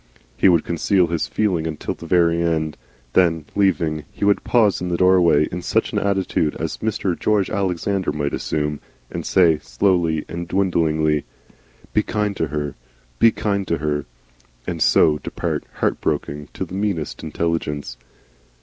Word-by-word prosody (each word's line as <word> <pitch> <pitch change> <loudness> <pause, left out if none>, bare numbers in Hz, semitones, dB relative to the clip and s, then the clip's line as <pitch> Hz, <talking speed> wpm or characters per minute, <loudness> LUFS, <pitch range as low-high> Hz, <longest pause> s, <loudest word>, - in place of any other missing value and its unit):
He 65 - +4
would 85 -3 +3
conceal 90 +2 +2
his 85 -1 -2
feeling 90 -7 0
until 80 -2 -4
the 85 - -11
very 85 -1 +3
end. 80 -2 0 0.4
Then, 80 -4 +3
leaving, 80 -6 +1
he - - -3
would 100 0 +3
pause 110 -6 +3
in 90 - -2
the 85 - 0
doorway 90 -5 +4
in 90 - -4
such - - 0
an - - +1
attitude 95 -6 0
as 80 -1 -3
Mr. 105 -4 -1
George 105 -3 +1
Alexander 95 -1 -1
might 75 -1 -2
assume, 75 -1 -2 0.3
and - - -4
say, 85 -5 +4
slowly 85 -5 +1
and 85 +1 -5
dwindlingly: 80 -5 +1 0.7
"Be 105 - +4
kind 105 -1 -2
to 80 - 0
her 75 -1 -3 0.5
BE 115 - +7
kind 100 -3 -2
to 85 - 0
her," 75 -1 -2 0.6
and 85 -3 -4
so 75 0 +4
depart, - - -3
heartbroken 75 0 -2
to - - -3
the - - -12
meanest 95 -6 -2
intelligence. 80 -5 -2
85 Hz, 155 wpm, -21 LUFS, 75-95 Hz, 0.7 s, BE